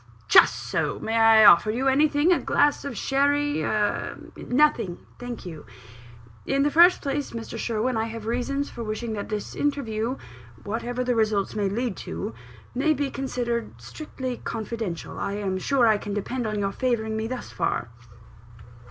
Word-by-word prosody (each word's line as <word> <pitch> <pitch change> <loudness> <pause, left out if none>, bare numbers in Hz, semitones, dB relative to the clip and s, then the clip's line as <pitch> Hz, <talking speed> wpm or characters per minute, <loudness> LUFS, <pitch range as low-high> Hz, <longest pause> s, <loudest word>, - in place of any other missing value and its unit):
"Just - - +7
so. - - -2
May 225 - -3
I 225 -1 +7
offer 175 +4 +7
you 250 +5 0
anything? 290 +4 +3
a - - +1
glass 290 0 +2
of 275 -6 -5
sherry, 285 +4 +1
a 210 -1 -1
" - - -19
"Nothing, 245 -9 +1 0.2
thank 245 -3 -7
you. 160 -4 -8 0.8
In 275 0 +1
the 290 - +1
first 345 +4 +6
place, 280 0 -2
Mr. 230 -1 -6
Sherwin, 230 +1 -1
I 220 - 0
have 225 -1 -7
reasons 250 +5 -1
for 235 - -7
wishing 220 +1 -4
that 205 -1 -5
this 210 -2 -4
interview, 255 -4 -2 0.5
whatever 240 +4 -3
results 220 -5 +1
it - - -7
may 200 -2 +1
lead 230 +1 -2
to, 85 +7 -5 0.4
may 305 +5 +2
be 285 0 -2
considered 240 -3 -3
strictly 260 -5 -6
confidential. 220 -6 -5
I 200 - -2
am 195 -2 -2
sure 260 +4 +2
I 215 -2 +4
can 205 0 -5
depend 240 +3 -3
on 215 -1 -2
your 200 -1 -1
favouring 220 -2 -1
me 220 0 -2
thus 250 +1 -6
far?" 120 - -2
235 Hz, 170 wpm, -25 LUFS, 215-270 Hz, 0.8 s, Just